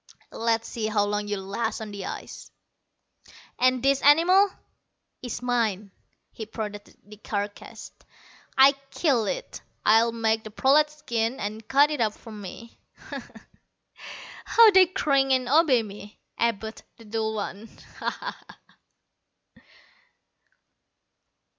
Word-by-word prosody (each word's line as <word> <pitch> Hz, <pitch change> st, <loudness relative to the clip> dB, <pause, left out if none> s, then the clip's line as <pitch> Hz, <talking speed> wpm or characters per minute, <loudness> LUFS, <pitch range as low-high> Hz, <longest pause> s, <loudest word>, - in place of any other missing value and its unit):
Let's 230 Hz, 0 st, -1 dB
see 220 Hz, -2 st, -3 dB
how 210 Hz, -1 st, +1 dB
long 205 Hz, 0 st, -2 dB
you'll 200 Hz, -2 st, -4 dB
last 220 Hz, +4 st, -3 dB
on 220 Hz, -1 st, -7 dB
the 200 Hz, -2 st, -6 dB
ice!" -, -, -8 dB, 1.2 s
"This 270 Hz, +2 st, +1 dB
animal 355 Hz, +7 st, +5 dB, 0.7 s
is 245 Hz, -1 st, -6 dB
mine." 220 Hz, -5 st, -1 dB, 0.4 s
He 220 Hz, -, -8 dB
prodded 210 Hz, -2 st, -7 dB
the 210 Hz, +1 st, -14 dB
carcass. 205 Hz, -1 st, -6 dB, 0.7 s
"I 270 Hz, +1 st, +8 dB, 0.2 s
killed 270 Hz, -10 st, +1 dB
it. -, -, -5 dB, 0.2 s
I'll 225 Hz, +2 st, +5 dB
make 225 Hz, -1 st, 0 dB
the 215 Hz, -, -8 dB
prolats 295 Hz, +7 st, +2 dB
skin 235 Hz, 0 st, -2 dB
and, 215 Hz, +1 st, -5 dB
cut 285 Hz, +4 st, +4 dB
it 295 Hz, -5 st, -2 dB
up 215 Hz, -2 st, +1 dB
for 225 Hz, -, -13 dB
me. 210 Hz, +2 st, -10 dB, 0.3 s
Ho -, -, -4 dB
ho, -, -, -16 dB, 1.1 s
how 455 Hz, -2 st, +7 dB
they 380 Hz, -2 st, +6 dB
cringe 275 Hz, -6 st, +1 dB
and 255 Hz, -1 st, +1 dB
obey 275 Hz, -4 st, +4 dB
me 205 Hz, 0 st, -11 dB, 0.2 s
Abud, 220 Hz, -1 st, -2 dB, 0.2 s
the 230 Hz, -, -15 dB
dull 220 Hz, 0 st, -2 dB
one! 205 Hz, +1 st, -5 dB, 0.3 s
Ho -, -, -1 dB
ho!" -, -, -6 dB
230 Hz, 125 wpm, -25 LUFS, 210-270 Hz, 1.2 s, I